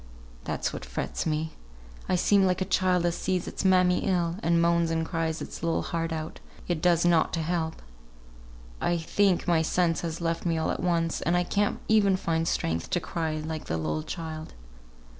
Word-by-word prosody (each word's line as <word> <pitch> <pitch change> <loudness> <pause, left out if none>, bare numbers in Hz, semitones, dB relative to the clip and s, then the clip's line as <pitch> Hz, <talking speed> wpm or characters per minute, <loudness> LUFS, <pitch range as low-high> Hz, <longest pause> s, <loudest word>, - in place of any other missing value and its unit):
That's - - -2
what - - -6
frets 65 - -3
me! 155 0 -1 0.6
I - - +3
seem 195 +2 +4
like 180 - +1
a 190 - 0
child 185 -2 +2
as 170 -1 +1
sees 180 0 -1
its - - -4
mammy 185 -1 +4
ill, 175 -3 +1
and 170 +1 +2
moans 170 0 +3
and 165 0 0
cries 165 -1 -2
its - - -8
little 165 0 0
heart 165 -1 -2
out, 160 0 -5 0.3
yet 170 -3 -2
does 175 -1 +3
nought 170 -2 +3
to 165 - 0
help. 160 -1 -2 1.0
I 175 - +1
think 185 +3 +1
my 170 -2 +4
sense 165 +1 +1
has 165 -1 -4
left 165 -1 -1
me 170 -2 0
all 160 - 0
at - - -3
once, 165 -2 0
and 170 +2 +2
I 175 - +2
can't 205 +3 0
even 200 -3 +4
find 165 -2 -1
strength 80 - -1
to 175 - +1
cry 160 -3 -3
like 155 0 -5
the 80 - -2
little 80 -1 -2
child." 160 - -6
170 Hz, 195 wpm, -27 LUFS, 160-180 Hz, 1.0 s, seem